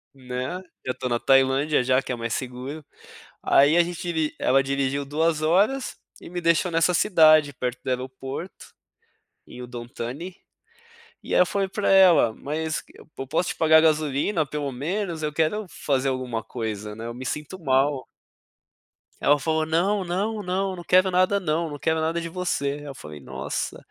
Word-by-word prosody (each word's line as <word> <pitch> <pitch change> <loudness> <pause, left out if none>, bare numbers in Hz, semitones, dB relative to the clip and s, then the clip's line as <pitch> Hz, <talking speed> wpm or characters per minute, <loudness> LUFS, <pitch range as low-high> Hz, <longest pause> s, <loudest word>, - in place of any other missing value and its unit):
Né, 130 +6 -5 0.3
já 130 - 0
to 130 0 -4
na 120 - 0
Tailândia 135 +2 +3
já 130 +1 +3
que - - -13
é 125 - -1
mais 115 -1 -4
seguro, 130 +4 -5 0.6
aí 145 +3 +4
a 175 - +6
gente 175 0 -6
diri 160 -3 -1
ela 135 +2 +3
dirigiu 140 +1 -1
2 155 +2 0
horas 205 +11 +1 0.2
e - - -10
me 180 - -4
deixou 170 +1 +2
nessa 165 +2 +2
cidade 155 -7 +5
perto 125 -1 -4
do - - -14
aeroporto, 130 +6 -5 0.8
em 125 - -11
Udontani, 125 +7 -7 0.9
e - - -3
ai - - +6
eu 180 - +5
falei 195 +1 -1
pra 200 +2 -2
ela: 185 -11 +6
"Mas 155 +5 -3 0.4
eu 135 - -5
posso 160 +4 0
te - - -3
pagar 160 -1 +6
gasolina 155 +2 +1
pelo 145 -1 -4
menos, 165 +5 -3
eu 150 - -2
quero 165 +7 0
fazer 135 -4 -1
alguma 130 -3 -2
coisa 105 -2 -5
né 115 - -7
eu 120 - -5
me 130 +2 -8
sinto 150 +7 -5
mal". 135 -1 +1 1.2
Ela 145 +1 +4
falou: 160 +1 0
"Não, 185 +6 +1
não, 205 +4 -2
não, 190 +1 -1
não 175 - -9
quero 185 +2 +4
nada 185 +2 +2
não, 165 -2 -1
não 145 -1 -7
quero 160 0 0
nada 165 +2 0
de 170 - -4
você", 180 -5 -2
aí - - -11
eu 140 -2 -7
falei 75 -1 -10
"Nossa", - - -4
155 Hz, 175 wpm, -24 LUFS, 130-175 Hz, 1.2 s, a